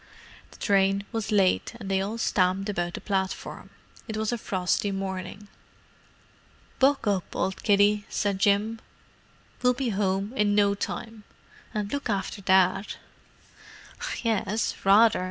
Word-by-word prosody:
The - - -16
train 195 0 +2
was 225 -2 -3
late, 200 +2 +2
and 205 - -7
they 190 0 +1
all 205 +4 -3
stamped 195 -2 +1
about 175 -3 -2
the - - -7
platform—it 195 +2 -5
was 220 +1 -1
a 240 - -1
frosty 190 +1 0
morning. 195 +1 -5 1.3
"Buck 275 +1 +3
up, 200 -4 -1
old 190 - -2
kiddie," 205 0 +3
said 200 -2 -1
Jim. 205 +3 +2 0.8
"We'll 250 0 +3
be 260 -1 -1
home 195 +1 -1
in 205 -4 +2
no 200 -1 +4
time. 220 +2 -5 0.5
And 210 -1 -3
look 285 -4 -3
after 200 0 -2
Dad." 190 +1 +2 1.3
"Yes—rather!" 215 0 +3
205 Hz, 125 wpm, -26 LUFS, 195-220 Hz, 1.3 s, no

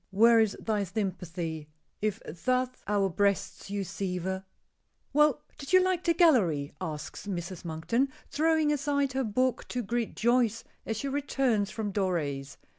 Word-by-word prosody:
where 225 +4 +6
is 220 -2 +2
thy 215 -2 0
sympathy 175 -5 -4 0.3
If 215 0 0
thus 255 +10 0 0.2
our 200 -1 +2
breasts 200 +2 0
you 200 0 -2
sever?" 190 0 -3 0.7
"Well, 300 -2 +4 0.2
did 280 +5 -6
you 370 - +9
like 370 -1 +1
the 335 -1 +2
gallery?" 185 - +3
asks 155 +3 -5
Mrs. 180 -1 -4
Monkton, 170 +11 0 0.2
throwing 315 -1 +2
aside 280 -1 0
her 265 0 0
book 255 +3 0
to 250 -1 -3
greet 235 +2 -2
Joyce 235 -1 +2 0.2
as 225 - -1
she 280 - -3
returns 270 -7 +1
from 210 -3 -4
Doré's. 150 -8 -1
215 Hz, 145 wpm, -29 LUFS, 185-260 Hz, 0.7 s, you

